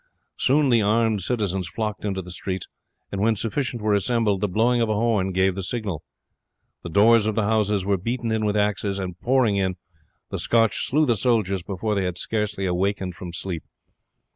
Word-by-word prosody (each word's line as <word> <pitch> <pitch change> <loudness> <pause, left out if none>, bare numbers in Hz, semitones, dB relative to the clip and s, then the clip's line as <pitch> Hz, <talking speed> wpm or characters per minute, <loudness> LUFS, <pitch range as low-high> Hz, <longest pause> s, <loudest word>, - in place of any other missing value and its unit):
Soon 140 +1 +3
the 115 -2 +5
armed 110 0 +2
citizens 95 -4 -1
flocked 110 -2 -4
into 95 -2 -2
the 90 - -9
streets, 95 +1 -4 0.5
and 100 - -3
when 110 +1 +3
sufficient 120 +2 -2
were 105 -1 +2
assembled 105 -1 +1
the 105 - +2
blowing 120 +5 +2
of 115 - +1
a 110 - +1
horn 105 -4 +1
gave 95 +1 +2
the 95 - -4
signal. 95 -5 -3 0.8
The 85 - -7
doors 110 +5 +5
of 110 - -1
the 110 - +1
houses 105 -2 +1
were 100 -1 +2
beaten 115 +4 -2
in 110 0 0
with 105 0 +1
axes, 105 -1 0
and, 90 -3 -5
pouring 120 -4 +2
in, 95 -1 0 0.6
the - - -3
Scotch 115 -2 +2
slew 155 +3 +3
the 120 -4 +2
soldiers 100 -4 +1
before 100 +4 -3
they 100 -2 0
had 90 -1 -3
scarce 105 0 -2
awakened 95 0 -1
from 90 -1 -8
sleep. 85 -1 -4
105 Hz, 190 wpm, -24 LUFS, 95-115 Hz, 0.8 s, the